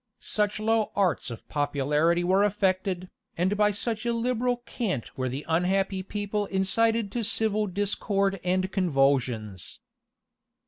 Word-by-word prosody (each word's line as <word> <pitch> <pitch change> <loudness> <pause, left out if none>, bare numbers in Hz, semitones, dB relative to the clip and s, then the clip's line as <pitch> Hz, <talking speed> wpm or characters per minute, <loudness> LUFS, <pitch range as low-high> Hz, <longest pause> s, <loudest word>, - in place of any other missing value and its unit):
Such 210 0 -1
low 220 0 +1
arts 195 -8 +1
of 115 -2 -9
popularity 150 +4 +1
were 190 +3 +3
affected, 185 -2 0 0.3
and 185 +4 +1
by 210 0 +4
such 215 +1 -2
illiberal 240 +1 0
cant 215 - -3
were 130 -1 -2
the 135 +4 -5
unhappy 190 +3 +1
people 205 +1 -3
incited 210 +3 +1
to 235 +2 -2
civil 215 -1 +2
discord 195 0 0
and 185 +1 0
convulsions. 135 - 0
195 Hz, 125 wpm, -27 LUFS, 170-210 Hz, 0.3 s, by